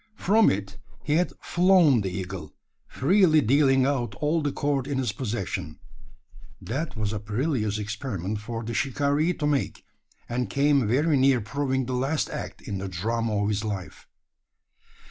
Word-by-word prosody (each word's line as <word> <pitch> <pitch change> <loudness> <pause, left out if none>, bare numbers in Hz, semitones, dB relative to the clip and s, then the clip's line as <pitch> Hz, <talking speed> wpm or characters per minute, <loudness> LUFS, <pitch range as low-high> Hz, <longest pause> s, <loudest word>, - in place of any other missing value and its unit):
From 215 +2 +4
it 100 +1 -3 0.2
he 150 +1 +1
had 180 - +1
"flown" 175 - +4
the 95 - -2
eagle 90 0 -6 0.3
freely 170 +2 +4
dealing 135 +1 +3
out 135 -4 -1
all 155 +2 0
the 145 -1 -1
cord 140 -2 -1
in 140 -2 -2
his 125 -5 0
possession. 100 - -4 0.8
That 140 +8 -4
was 105 -1 -1
a 105 - -2
perilous 110 0 -1
experiment 105 -2 -4
for 115 +2 -5
the 115 +1 -4
shikaree 145 +6 +1
to 150 - -2
make; 145 -2 -1 0.4
and 125 +1 -2
came 140 -3 +2
very 145 +6 +2
near 130 -1 +4
proving 130 +3 -1
the 130 - -4
last 135 +5 -1
act - - -6
in 100 -2 -4
the 95 - -4
drama 105 +4 -1
of 100 - 0
his 105 0 -1
life. 100 -4 -6
130 Hz, 160 wpm, -26 LUFS, 105-145 Hz, 0.8 s, From